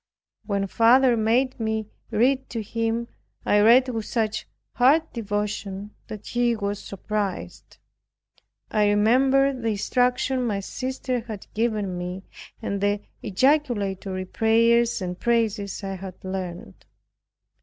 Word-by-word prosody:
When 200 -2 0
father 240 +5 +5
made 240 +4 +1
me 220 -1 -1 0.2
read 260 +4 +2
to 230 -2 -4
him, 230 +2 -2 0.4
I 205 - +4
read 240 +5 +6
with 225 -3 -3
such 220 -3 -2 0.3
heartfelt 295 +6 +3
devotion 205 -2 -3 0.2
that 215 -2 -8
he 240 -1 +1
was 205 -1 -3
surprised. 200 0 -4 0.9
I 210 -1 +3
remembered 260 +5 +3
the 230 - 0
instruction 250 +4 +1
my 210 -4 -1
sister 255 +4 -3
had 215 -4 -7
given 210 -5 -1
me, 180 +2 -5 0.4
and 200 -1 -2
the 205 0 +1 0.2
ejaculatory 205 -6 0
prayers 230 +2 +3
and 180 0 -4
praises 220 -4 0
I 195 -1 -4
had 185 -1 -8
learned. 185 - -6
220 Hz, 120 wpm, -24 LUFS, 200-245 Hz, 0.9 s, read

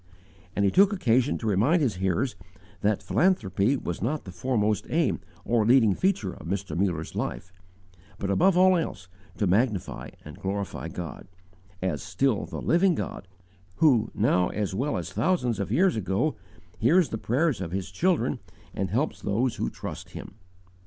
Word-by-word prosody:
_ - - -33 0.5
And 100 - +2
he 95 - +3
took 195 +1 +5
occasion 130 - +2
to - - -7
remind 110 - +3
his 115 -9 0
hearers 95 +7 0 0.5
that 100 -1 +1
philanthropy 115 - +2
was 85 -8 -5
not 145 +8 -1
the 95 - -8
foremost 105 +1 0
aim - - +1 0.3
or 115 -2 +2
leading 115 -2 +5
feature 180 - 0
of - - -10
Mr. 95 +2 -3
Muller's 85 -4 -1
life, 95 0 -4 0.6
but 100 - -2
above 180 - +4
all 185 0 +6
else 100 - -3 0.3
to 105 - +1
magnify 100 +1 0 0.2
and 75 -1 -10
glorify 100 -3 -3
God, 85 -1 -7 0.6
_"as 95 - -1
still 105 +6 0
the - - -6
living 175 +1 +3
God 95 - -5 0.5
who, 125 -9 +4
now 90 -4 +2
as 105 -3 -2
well 135 +9 -1
as - - -5
thousands 125 - +1
of 100 - -3
years 190 -3 +3
ago, 110 - 0 0.4
hears 165 +8 +4
the 110 - -4
prayers 135 +2 0
of 90 - -3
His 95 0 -4
children 175 - +1 0.3
and 95 -1 -2
helps 130 - -1
those 115 +4 0
who - - -1
trust - - -8
Him." - - -8
110 Hz, 165 wpm, -26 LUFS, 95-145 Hz, 0.6 s, all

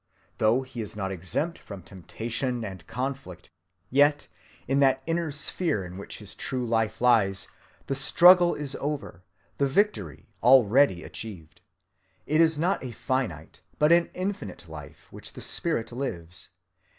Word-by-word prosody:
Though 115 +4 +3
he 130 -3 -7
is 105 - -5
not 95 -2 -3
exempt 95 - -2
from 100 -4 -10
temptation 115 +6 -4
and 95 -4 -8
conflict, 125 -7 -5 0.4
[yet] 145 +2 +3 0.4
in 135 +2 +2
that 135 -1 +3
inner 165 0 -1
sphere 145 - -2
in 90 +1 -9
which 100 - -8
his 105 -2 -8
true 125 +5 -3
life 115 -1 0
lies, 105 -6 +3 0.4
the - - -2
struggle 175 +6 +6
is 145 -2 -3
over, 140 - -4 0.4
the 140 - +3
victory 135 - 0 0.2
already 125 -4 +5
achieved. 90 -9 -9 0.6
It 155 +2 +3
is 160 -2 +3
not 175 +2 0
a 130 - -4
finite 115 - -3 0.2
but 150 +2 +4
an 170 0 +5
infinite 195 +2 -4
life - - -11
which - - -10
the - - -10
spirit 160 -11 -2
lives. 90 -10 -5
125 Hz, 145 wpm, -27 LUFS, 100-145 Hz, 0.6 s, struggle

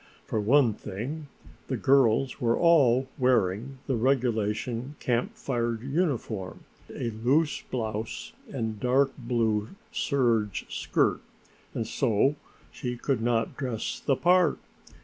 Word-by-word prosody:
For 110 - -1
one 120 +1 +4
thing 125 +11 -6 0.4
the 130 - -1
girls 130 -2 +3
were 115 -1 +2
all 135 -7 +4
wearing 125 0 +1
the 135 - 0
regulation 120 0 0
Camp 120 -1 -1
Fire 120 -3 -1
uniform, 125 - -2 0.3
a 115 - -3
loose 130 +8 +1
blouse 110 -2 -4 0.2
and 110 -2 -3
dark 130 +3 +3
blue 115 -4 0 0.2
serge 120 - +1
skirt, - - +1 0.5
and 115 - -1
so 125 +4 +2 0.4
she 125 -1 -4
could 130 -1 -1
not 115 -1 0
dress 125 -5 -3
the 135 - +2
part. 175 +1 +3
120 Hz, 115 wpm, -27 LUFS, 110-135 Hz, 0.5 s, one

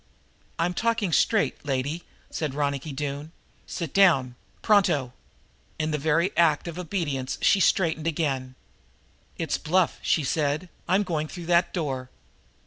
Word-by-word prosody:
"I'm 175 +2 0
talking 230 -3 0
straight, 220 +5 +2
lady," 145 +4 -2 0.3
said 150 -4 -3
Ronicky 145 0 -1
Doone. 145 +2 -4 0.4
"Sit 165 -5 -5
down 160 -11 +4 0.3
pronto!" 150 - +3 0.6
In 155 0 -1
the 150 - -1
very 160 +6 +1
act 165 -2 +3
of 170 +1 -6
obedience 150 -8 -2
she 195 - +4
straightened 165 -4 +2
again. 135 -5 -1 0.8
"It's - - -1
bluff," 175 +3 +1
she 155 - +1
said. 150 +4 -1 0.2
"I'm 190 +3 +3
going 160 -5 -2
through 175 +1 -8
that 170 +1 +3
door!" 135 -7 -3
155 Hz, 135 wpm, -26 LUFS, 140-175 Hz, 0.8 s, down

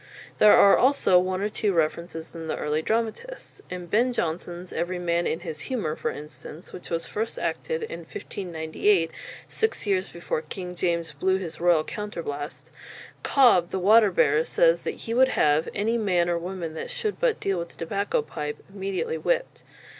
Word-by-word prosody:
There 210 - +8
are 200 - +8
also 260 -9 +5
one 185 +1 -1
or 210 - 0
two 210 -1 0
references 165 0 -2
in 165 -1 -7
the - - -2
early 150 +1 -1
dramatists. 230 - -3
In 180 -1 -5
Ben 235 +8 +2
Jonson's 175 -1 -3
"Every 180 +1 -2
Man 170 -1 0
in 165 - -2
his 160 -4 -5
Humour," 210 -12 -1
for - - -2
instance, 150 +2 -9
which 180 - -9
was 165 -1 -2
first 225 +2 -3
acted 475 -1 -2
in 450 - -5
1598, 165 0 -1 0.4
six 445 - 0
years 195 -2 +1
before 170 -2 -3
King 180 +3 -6
James 170 -2 -1
blew 185 +6 +1
his 175 -4 -7
royal 170 -3 +4
"Counter 205 -1 -5
blaste," 145 +1 -6 0.5
Cob, 235 -11 +5
the - - -2
water 210 +3 +6
bearer, 430 - +3
says - - +3
that - - -2
he 230 - -2
would 260 +2 +5
have 150 - +2
any 225 +3 +1
"man 180 -5 +2
or 170 - +1
woman 175 -2 -5
that 160 - -6
should 425 -2 -3
but - - +1
deal 195 -2 0
with 170 0 -7
a - - -27
tobacco 195 -1 -1
pipe," 150 0 -5 0.2
immediately 200 - -2
whipped. - - -1
180 Hz, 180 wpm, -26 LUFS, 165-215 Hz, 0.5 s, There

